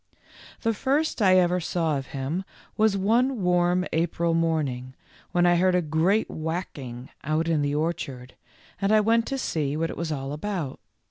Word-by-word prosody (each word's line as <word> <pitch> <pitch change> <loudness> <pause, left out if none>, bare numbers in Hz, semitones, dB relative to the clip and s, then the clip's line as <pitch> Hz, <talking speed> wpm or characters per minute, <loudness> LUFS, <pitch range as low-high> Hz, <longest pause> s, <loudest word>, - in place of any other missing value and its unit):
The 225 - +1
first 275 +4 0
I 185 -2 +6
ever 180 0 +3
saw 165 -2 0
of 135 -1 -4
him 145 +6 -3 0.3
was 215 -2 +3
one 230 +3 +2
warm 180 0 +2
April 170 0 +1
morning 145 -6 -1 0.4
when 175 0 +3
I 175 0 +5
heard 185 +1 +3
a 180 - +3
great 165 +8 +2
whacking 145 -7 -5
out 155 +3 0
in 160 -3 +2
the 145 0 0
orchard, 145 -6 -3 0.5
and 195 +1 +2
I 215 - +6
went 225 +2 +2
to 275 - -2
see 150 - -1
w - - -2
T - - -3
hat 165 - 0
it - - -8
was 170 -1 -3
all 135 -1 -3
about. 160 -3 -4
170 Hz, 185 wpm, -26 LUFS, 150-190 Hz, 0.5 s, I